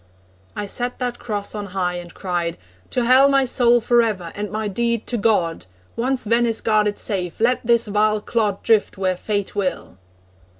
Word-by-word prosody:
I 205 Hz, -, -3 dB
set 245 Hz, +4 st, -2 dB
that 245 Hz, -1 st, -3 dB
cross 205 Hz, -4 st, -4 dB
on 205 Hz, -1 st, -5 dB
high, 180 Hz, -1 st, 0 dB
and 175 Hz, -1 st, -8 dB
cried: 175 Hz, -3 st, -3 dB, 0.3 s
'To 250 Hz, -, 0 dB
Hell 260 Hz, +3 st, +6 dB
My 275 Hz, -1 st, +3 dB
soul 240 Hz, -1 st, +3 dB
for 240 Hz, +1 st, +3 dB
ever, 190 Hz, -7 st, -2 dB
and 205 Hz, 0 st, -4 dB
my 215 Hz, 0 st, -2 dB
deed 235 Hz, +2 st, -1 dB
to 245 Hz, -, -2 dB
God! 190 Hz, -, 0 dB, 0.3 s
Once 255 Hz, +2 st, 0 dB
Venice 230 Hz, +1 st, +1 dB
guarded 210 Hz, -2 st, +1 dB
safe, 180 Hz, -5 st, -3 dB
let 245 Hz, +3 st, +2 dB
this 235 Hz, 0 st, +3 dB
vile 215 Hz, 0 st, +1 dB
clod 210 Hz, -2 st, -1 dB
Drift 220 Hz, -3 st, +2 dB
where 185 Hz, -1 st, 0 dB
fate 205 Hz, +2 st, -3 dB
will.' 185 Hz, -, -3 dB
215 Hz, 175 wpm, -21 LUFS, 195-235 Hz, 0.3 s, Hell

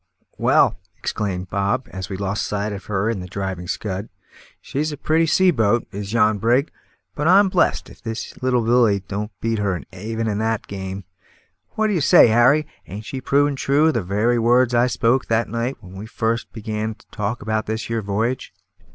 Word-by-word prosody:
"Well," -, -, +3 dB, 0.2 s
exclaimed 95 Hz, -4 st, -3 dB
Bob, 100 Hz, +6 st, 0 dB
as 95 Hz, -1 st, -6 dB
we 95 Hz, -, -4 dB
lost 100 Hz, +1 st, -2 dB
sight 105 Hz, 0 st, -2 dB
of 95 Hz, -2 st, -8 dB
her 100 Hz, 0 st, -1 dB
in 115 Hz, -3 st, -1 dB
the 90 Hz, -, -7 dB
driving 95 Hz, -2 st, -4 dB
scud, 100 Hz, +1 st, -4 dB, 0.5 s
"she's 150 Hz, +3 st, -3 dB
a 150 Hz, -, -6 dB
pretty 160 Hz, +3 st, +2 dB
sea 185 Hz, +3 st, +4 dB
boat, 115 Hz, -4 st, +1 dB
is 100 Hz, -1 st, -6 dB
yon 110 Hz, -2 st, +3 dB
brig; 120 Hz, +7 st, +2 dB, 0.4 s
but 150 Hz, +2 st, -1 dB
I'm 195 Hz, +2 st, +6 dB
blest 185 Hz, -2 st, +1 dB
if -, -, -15 dB
the 115 Hz, -2 st, -4 dB, 0.2 s
little 125 Hz, -2 st, +2 dB
Lily 115 Hz, -4 st, +3 dB
don't 105 Hz, +2 st, -4 dB
beat 115 Hz, -1 st, 0 dB
her 95 Hz, -4 st, 0 dB
even 110 Hz, +4 st, -3 dB
at 105 Hz, -1 st, -1 dB
that 110 Hz, -1 st, -1 dB
game. 95 Hz, 0 st, -6 dB, 0.7 s
What 215 Hz, 0 st, +1 dB
say -, -, +7 dB
you, 115 Hz, -, +3 dB
Harry; 135 Hz, +6 st, +5 dB, 0.2 s
ain't 105 Hz, +4 st, -7 dB
she 130 Hz, +3 st, -5 dB
proving 145 Hz, +2 st, +2 dB
true 145 Hz, +4 st, +3 dB
the 115 Hz, -6 st, -1 dB
very 105 Hz, +6 st, +1 dB
words 120 Hz, +2 st, +3 dB
I 120 Hz, +1 st, +4 dB
spoke 125 Hz, +1 st, +1 dB
that 115 Hz, +1 st, +1 dB
night 120 Hz, +3 st, -2 dB
when 95 Hz, -2 st, -13 dB
we 100 Hz, +3 st, -8 dB
first 115 Hz, +1 st, -2 dB
began 110 Hz, 0 st, -4 dB
to -, -, -24 dB
talk 105 Hz, +2 st, -3 dB
about 110 Hz, 0 st, -1 dB
this 110 Hz, +1 st, -2 dB
here 115 Hz, -1 st, -2 dB
v'yage?" 110 Hz, +5 st, -2 dB
110 Hz, 190 wpm, -21 LUFS, 100-125 Hz, 0.7 s, say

